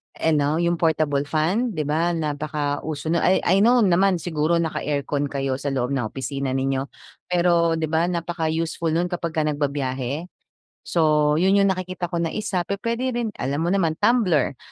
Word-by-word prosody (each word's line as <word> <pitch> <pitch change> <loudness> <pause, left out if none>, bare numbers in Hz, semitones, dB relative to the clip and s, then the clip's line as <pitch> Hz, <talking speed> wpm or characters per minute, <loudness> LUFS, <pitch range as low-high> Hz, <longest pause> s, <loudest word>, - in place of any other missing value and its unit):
ano 150 -2 +1
yung 170 0 0
portable 155 -3 +1
fan. 185 +10 0
'Di 155 - -1
ba, 165 +4 0
napaka-uso 150 0 -3
nun 170 - +2
I 185 - +2
I 190 +3 +3
know 235 +3 +5
naman 190 0 +3
siguro 165 -1 0
naka-aircon 145 -3 -1
kayo 135 -1 -2
sa 145 - -5
loob 130 -2 -1
ng 130 -5 -1
opisina 135 +2 -3
ninyo, 135 0 -1 0.4
pero, 170 -2 +2
'di 160 -1 -2
ba, 165 +2 +2
napaka-useful 165 -1 -2
nun 175 +2 0
kapagka 165 -2 -2
nagbabiyahe? 145 +1 -2 0.5
So, 150 -3 +2
yun 190 +4 +3
yung 200 0 +4
nakikita 185 -1 -3
ko 175 - -2
na 165 -1 -1
isa, 210 -4 -1
pupuwede 230 +6 -2
rin 235 -2 -1
alam 140 +3 -2
mo 170 - 0
naman 180 -4 +1
tumbler. 200 - +2
160 Hz, 165 wpm, -23 LUFS, 145-175 Hz, 0.5 s, know